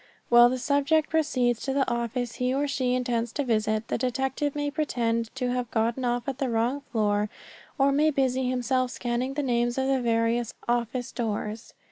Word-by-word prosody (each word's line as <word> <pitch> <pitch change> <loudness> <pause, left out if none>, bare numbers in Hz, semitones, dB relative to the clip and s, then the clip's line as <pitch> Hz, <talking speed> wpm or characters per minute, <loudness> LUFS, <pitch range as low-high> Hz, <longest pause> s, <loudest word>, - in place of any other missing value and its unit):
While 240 0 +8
the 255 - -1
subject 285 +4 +1
proceeds 255 -7 +1
to 270 - -2
the 275 -1 +1
office 235 0 -2
he 250 0 0
or 280 +2 0
she 255 -3 0
intends 240 -2 -1
to 290 - -1
visit, 220 -2 0
the - - -2
detective 265 +3 -1
may 290 0 -1
pretend 230 -7 -1
to 250 -1 -1
have 250 -1 -2
gotten 230 +3 0
off 245 0 -1
at 270 -1 -3
the 270 - 0
wrong 235 +5 0
floor, 210 -2 +1 0.5
or 275 0 +4
may 300 +3 +3
busy 260 -3 +1
himself 255 0 0
scanning 245 +2 -2
the 295 - -1
names 240 -1 0
on 265 - +1
the 265 -1 +2
various 230 0 0
office 240 +1 -1
doors. 215 -1 -4
250 Hz, 185 wpm, -27 LUFS, 235-270 Hz, 0.5 s, While